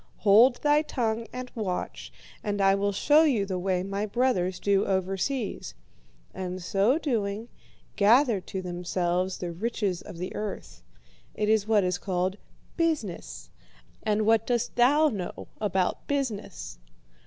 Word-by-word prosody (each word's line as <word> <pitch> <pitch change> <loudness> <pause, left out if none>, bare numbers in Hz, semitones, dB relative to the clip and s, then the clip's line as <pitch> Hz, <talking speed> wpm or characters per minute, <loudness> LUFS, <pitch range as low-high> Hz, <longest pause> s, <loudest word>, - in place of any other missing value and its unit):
Hold 225 +5 +7
thy 295 0 +4
tongue 230 -6 -2
and 250 0 -6
watch, 195 -6 -4 0.3
and 205 -1 -2
I 195 0 +5
will 200 +1 +1
show 290 +10 +4
you 255 -11 +2
the 190 -2 -3
way 185 0 0
my 200 +2 -3
brothers 200 -6 0
do 200 -1 +2
overseas, 195 +6 -2 0.6
and, 185 0 -4
so 195 - +2
doing, 225 -7 -2 0.5
gather 230 0 +4
to 190 +1 -6
themselves 180 +1 -1
the 175 -1 -4
riches 195 -1 -2
of - - -10
the 180 +2 -5
earth. 190 - -6 0.5
It 210 0 0
is 220 -1 +3
what 215 -3 +4
is 180 -1 -1
called 185 0 -1 0.4
"business," 220 - -2 0.5
and 215 0 0
what 225 0 +3
dost 240 -1 -1
thou 290 +6 +5
know 190 -7 -6
about 190 -3 -1
business?' 215 - -3
200 Hz, 140 wpm, -27 LUFS, 185-235 Hz, 0.6 s, Hold